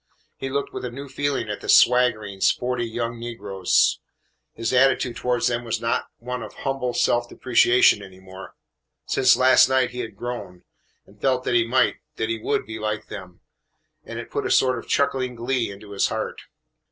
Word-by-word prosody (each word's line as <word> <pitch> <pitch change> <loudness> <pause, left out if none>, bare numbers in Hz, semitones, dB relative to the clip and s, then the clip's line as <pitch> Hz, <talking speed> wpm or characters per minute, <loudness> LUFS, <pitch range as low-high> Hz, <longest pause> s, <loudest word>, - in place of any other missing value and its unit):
He 135 - -5
looked 140 +1 -3
with - - -6
a 125 - -3
new 140 +4 -8
feeling 140 -3 -2
at 105 -1 -5
the - - -8
swaggering, 115 -6 +4
sporty 125 +2 +1
young 115 0 -4
negroes. 115 -6 +1 0.6
His 115 +2 -2
attitude 130 -1 +3
towards 125 -1 -1
them 120 -1 0
was 115 -2 -2
not 115 0 -1
one 125 +1 -5
of 110 - -9
humble 135 -3 -3
self 120 0 +1
depreciation 120 -3 +4
any 95 -2 -12
more. 95 0 -12 0.5
Since - - +4
last 130 0 +6
night 130 -2 +2
he 125 - -7
had 115 -2 -5
grown, 120 -7 -6 0.4
and 100 +1 -22
felt 130 -2 +1
that - - -1
he 115 -1 +3
might, 130 +3 +2 0.2
that 110 - -2
he 115 0 -2
would, - - -1
be 110 +1 -7
like 105 0 -3
them, 95 -4 -10 0.6
and - - -8
it - - -8
put - - -2
a - - -4
sort 130 -2 +3
of - - -12
chuckling 130 -3 0
glee 120 0 -1
into 100 +1 -11
his 100 - +1
heart. - - -4
120 Hz, 190 wpm, -23 LUFS, 110-125 Hz, 0.6 s, last